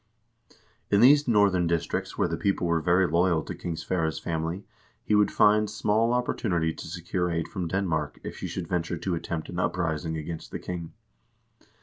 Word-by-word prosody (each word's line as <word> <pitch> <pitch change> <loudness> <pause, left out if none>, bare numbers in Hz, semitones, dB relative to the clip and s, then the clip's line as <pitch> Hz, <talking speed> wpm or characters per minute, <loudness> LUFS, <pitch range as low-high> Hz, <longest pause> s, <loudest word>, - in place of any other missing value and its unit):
In 100 - +4
these 145 +5 +6
northern 100 -6 +3
districts 85 0 -2
where - - +2
the - - -2
people 100 -3 0
were 85 -1 +1
very 90 +3 +3
loyal 85 -2 +2
to - - -6
King 85 -2 -5
Sverre's 80 -1 -1
family, 80 +3 -3 0.4
he - - -1
would 105 -1 +4
find 105 0 +4
small 110 +2 +1
oppor 125 - -2
tunity 85 -7 0
to - - -8
secure 90 +2 -2
aid 85 -1 -1
from 90 -3 -4
Denmark 80 -5 -1
if - - -7
he - - -4
should 90 -3 -5
venture 85 -1 -1
to 95 - -2
attempt 80 -1 -4
an 90 - -4
uprising 80 -3 -1
against 80 +1 -6
the - - -5
king. 85 -2 -6
90 Hz, 185 wpm, -27 LUFS, 80-100 Hz, 0.4 s, these